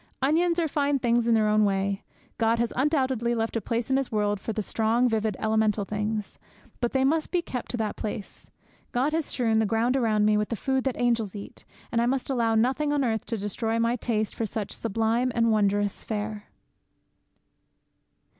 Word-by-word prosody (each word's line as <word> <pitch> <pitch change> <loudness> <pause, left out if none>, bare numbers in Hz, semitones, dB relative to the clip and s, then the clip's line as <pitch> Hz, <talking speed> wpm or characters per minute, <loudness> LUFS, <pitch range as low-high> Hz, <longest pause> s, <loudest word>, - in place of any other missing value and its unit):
Onions 335 +5 +2
are 335 -2 +2
fine 285 -1 +1
things 240 -2 +1
in 230 - +4
their 215 -1 +3
own 215 0 +4
way. 195 0 0 0.4
God 225 0 +3
has 235 0 -1
undoubtedly 260 -4 +1
left 225 0 -2
a 230 - 0
place 230 +4 -2
in 265 - +4
His 270 -2 -2
world 205 -2 0
for 225 - -4
the 215 -1 -2
strong, 225 +4 +2
vivid, 220 -3 0
elemental 220 -2 +1
things. 210 0 -3 0.4
But 240 - -1
they 265 -1 +2
must 310 +4 +1
be 355 -2 0
kept 250 -6 -5
to 245 - -2
that 220 -2 -2
place. 210 -1 -6 0.4
God 265 +5 +1
has 320 -1 0
strewn 225 -3 +1
the 220 - +2
ground 230 +4 +1
around 220 -5 +2
me 210 0 +4
with 210 0 -1
the 230 - -1
food 265 +3 -1
that 265 - -1
angels 230 -4 +1
eat, 200 - -9 0.3
and 230 0 +2
I 235 - +2
must 265 +1 -1
allow 230 -3 +1
nothing 265 +6 +2
on 290 -1 +1
earth 220 -3 -1
to 230 - -2
destroy 220 +3 -2
my 230 +1 +2
taste 220 -3 -1
for 225 - -2
such 210 0 -4
sublime 230 +3 0
and 230 -1 +3
wondrous 205 -1 +1
fare. 210 -1 -4
230 Hz, 200 wpm, -26 LUFS, 215-255 Hz, 0.4 s, in